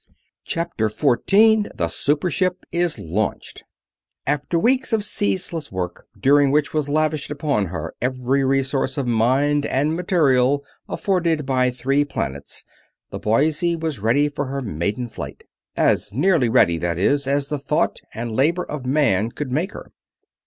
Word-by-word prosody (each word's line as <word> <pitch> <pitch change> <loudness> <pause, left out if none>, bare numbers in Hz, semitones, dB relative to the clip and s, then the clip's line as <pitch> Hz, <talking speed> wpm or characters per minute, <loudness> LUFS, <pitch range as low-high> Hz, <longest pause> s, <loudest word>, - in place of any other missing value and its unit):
CHAPTER 165 - -1
14 205 - +3
THE 85 - 0
SUPER 145 - 0
SHIP 185 -1 -1
IS 175 -1 0
LAUNCHED 100 +7 -3 0.6
After 145 +4 0
weeks 255 +7 +2
of 220 -2 +2
ceaseless 140 - -1
work, 90 -2 -5
during 145 +1 +4
which 150 +2 +1
was 150 -2 0
lavished 155 0 0
upon 140 - -1
her 85 -2 -5
every 130 +2 0
resource 135 0 0
of 140 - -1
mind 130 +5 +2
and 145 +4 0
material 140 -6 +2 0.2
afforded 170 -6 0
by 130 -1 +2
three 135 +3 +1
planets, 70 - -5 0.5
the - - -5
Boise 150 +9 +1
was 160 -6 -3
ready 120 +8 +2
for 145 0 -3
her 135 +1 -4
maiden 105 +5 -2
flight. - - -8 0.3
As 105 - +2
nearly 145 - +2
ready, 85 -8 +3
that 85 0 -2
is, 140 +9 +1
as 140 0 0
the 150 -1 -2
thought 150 +4 0 0.2
and 115 -1 -4
labor 165 +8 +2
of 145 -6 -6
man 125 -7 +2
could 130 +2 -6
make 165 +9 -1
her. - - -10
140 Hz, 150 wpm, -21 LUFS, 120-155 Hz, 0.6 s, during